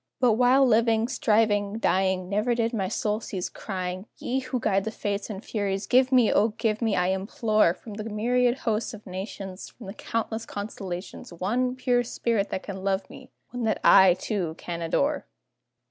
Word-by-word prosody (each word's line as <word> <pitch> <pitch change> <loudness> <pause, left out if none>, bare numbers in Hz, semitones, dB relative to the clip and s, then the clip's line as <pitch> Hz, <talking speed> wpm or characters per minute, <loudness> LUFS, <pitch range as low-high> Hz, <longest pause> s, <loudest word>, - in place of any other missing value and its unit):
But 250 -2 +4
while 250 +4 +5
living, 225 -1 +3
striving, 210 -4 +1
dying, 190 -3 +1
Never 210 +5 +1
did 230 0 0
my 195 -4 -1
soul 210 +2 -1
cease 190 -5 -4
crying, 185 0 -5
"Ye 260 +2 -1
who 255 -1 -3
guide 195 -3 +1
the 220 - -2
Fates 205 -1 -3
and 205 0 -7
Furies, 200 -2 -2
give, 255 +1 +4
O 235 -4 +4
give 220 -1 0
me, 220 -4 +1
I 180 +1 +2
implore, 215 -1 +1
From 220 - -11
the 215 +1 -6
myriad 240 +3 +1
hosts 220 0 -1
of 210 - -14
nations, 190 0 -7
From 235 - -13
the 195 - -7
countless 225 0 -3
constellations, 195 -4 -6
One 235 +9 -1
pure 245 -1 +1
spirit 230 -3 -1
that 190 - -4
can 190 -2 -7
love 195 -1 0
me 270 -1 -12 0.2
one 245 -1 -4
that 220 - 0
I, 190 -2 +7
too, 180 -5 -3
can 170 -1 -5
adore!" 280 - 0
215 Hz, 175 wpm, -26 LUFS, 190-235 Hz, 0.2 s, I